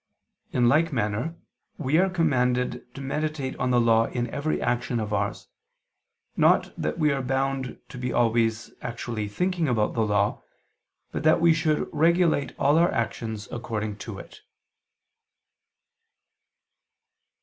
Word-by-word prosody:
In 125 -1 +3
like 160 +6 +3
manner 115 +5 -1 0.4
we 155 +1 +2
are 190 +1 +3
commanded 125 -8 0
to 140 - -7
meditate 145 -1 -2
on 125 - 0
the 125 -1 +4
Law 115 -1 +4
in 120 -1 -2
every 155 +2 -1
action 120 0 -1
of 105 -1 -3
ours, - - -2 0.9
not - - +3
that - - -3
we 155 -2 +3
are 135 -1 -1
bound 135 0 -2
to 125 - -9
be 125 0 -2
always 115 -1 +1
actually 115 -3 -4
thinking 175 - -1
about 110 -5 +1
the 115 - 0
Law, 105 -1 +1 0.7
but - - -3
that 155 +2 +4
we 170 0 +5
should 160 -1 0
regulate 165 -2 +2
all 145 +3 +3
our 170 - +4
actions 110 -3 -3
according 110 -3 -4
to - - -7
it. - - -12
125 Hz, 140 wpm, -26 LUFS, 115-155 Hz, 0.9 s, we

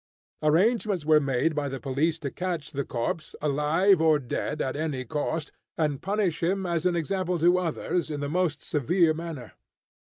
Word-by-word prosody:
Arrangements 190 +2 +2
were 155 0 +6
made 140 +3 +1
by 145 -2 -1
the 135 0 -5
police 150 +4 0
to 140 -4 -5
catch 175 -5 -4
the 140 -2 -2
corpse, 130 +6 -3
alive 155 +6 +3
or 160 -2 +5
dead, 145 +3 -3
at 130 - -1
any 145 -4 -2
cost, 150 +4 -2 0.3
and 150 -4 0
punish 195 -4 0
him 190 +3 0
as 170 0 0
an 180 - +1
example 180 +1 -1
to 175 +3 +4
others, 170 0 -2
in 150 -1 -3
the 145 - -2
most 165 -1 0
severe 160 +3 +2
manner. 155 -7 -7
160 Hz, 170 wpm, -27 LUFS, 145-175 Hz, 0.3 s, were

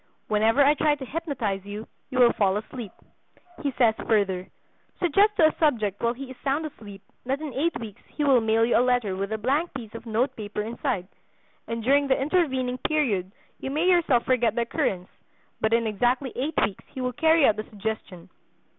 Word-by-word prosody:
Whenever 225 +6 +4
I 290 - +6
try 300 0 +2
to 275 -2 -8
hypnotize 260 - -3
you, 205 +2 -7 0.2
you 255 - -4
will 245 -2 +6
fall 195 -1 +2
asleep." 215 0 -7 0.7
He 280 - -1
says 230 -3 +5
further: 195 -4 +1 0.5
"Suggest 400 +5 +3
to 325 - +5
a - - -9
subject 220 - +1
while 235 +1 +1
he 265 +1 -8
is 260 - -11
sound 285 +3 0
asleep 205 -9 -10 0.2
that 270 +3 -1
in 305 -4 -6
eight 295 +3 0
weeks 220 -4 -9
he 300 - -4
will 270 -4 +5
mail 225 +1 +3
you 240 - +1
a - - +5
letter 245 -6 +1
with 195 +2 -3
a 220 - -1
blank 280 +10 0
piece 225 -5 -7
of 230 +1 -9
note 230 +4 0
paper 210 -1 -4
inside, 230 -4 -3 0.6
and 230 0 -4
during 280 +3 +3
the 265 - +2
intervening 265 -5 0
period 225 - 0 0.3
you - - -4
may 305 +5 0
yourself 330 -9 +3
forget 240 -3 +2
the 240 - +1
occurrence, 190 -5 -1 0.5
but 220 - +1
in 230 0 +3
exactly 245 +5 0
eight 290 +5 -2
weeks 195 - -7
he - - -9
will 250 0 -2
carry 320 +3 +4
out 215 - +3
the 215 - -3
suggestion. 205 -4 -6
245 Hz, 200 wpm, -25 LUFS, 215-280 Hz, 0.7 s, I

